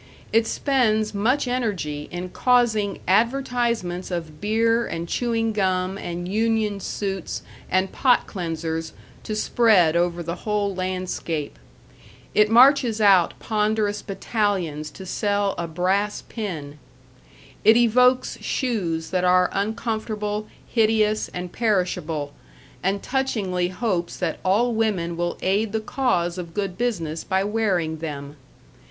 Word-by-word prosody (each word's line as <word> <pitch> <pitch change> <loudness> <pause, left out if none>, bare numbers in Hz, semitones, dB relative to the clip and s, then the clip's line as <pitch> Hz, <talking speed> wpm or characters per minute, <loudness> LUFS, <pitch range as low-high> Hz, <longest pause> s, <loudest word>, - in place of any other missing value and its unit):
It 225 0 +4
spends 220 -7 +1
much 250 +7 +1
energy 195 -12 -2
in 180 +1 -5
causing 225 -4 +2
advertisements 235 -4 +1
of 165 -4 -5
beer 225 +3 +2
and 165 +1 -4
chewing 225 +1 0
gum 185 -2 0
and 175 -2 -5
union 215 0 0
suits 195 -1 -4 0.3
and 185 +1 +1
pot 250 -2 +3
cleansers 165 -3 -4 0.3
to 215 - -4
spread 210 -7 +4
over 175 0 +1
the 170 +2 -4
whole 205 -2 -1
landscape. 185 -4 -3 0.7
It 210 0 +4
marches 245 -1 +5
out 195 -5 +5
ponderous 210 -1 0
battalions 190 -7 -2
to 190 +5 -11
sell 205 +1 0
a 170 - -2
brass 190 +5 0
pin. 155 -10 -6 0.8
It 220 +1 +7
evokes 250 +2 +3
shoes 180 - -2
that 180 -1 +1
are 180 0 +4
uncomfortable, 215 0 -2 0.2
hideous, 215 -2 +2
and 180 0 -6
perishable, 175 -9 -1 0.5
and 195 +1 -1
touchingly 210 -10 -1
hopes 180 -2 -2
that 170 -4 -2
all 225 +6 +2
women 200 -7 0
will 175 0 -2
aid 200 +3 +1
the 220 - +1
cause 185 -7 0
of 170 -2 -8
good 195 -3 -2
business 170 -10 -2
by 190 +1 0
wearing 195 -7 0
them. 145 -2 -6
200 Hz, 120 wpm, -23 LUFS, 175-225 Hz, 0.8 s, It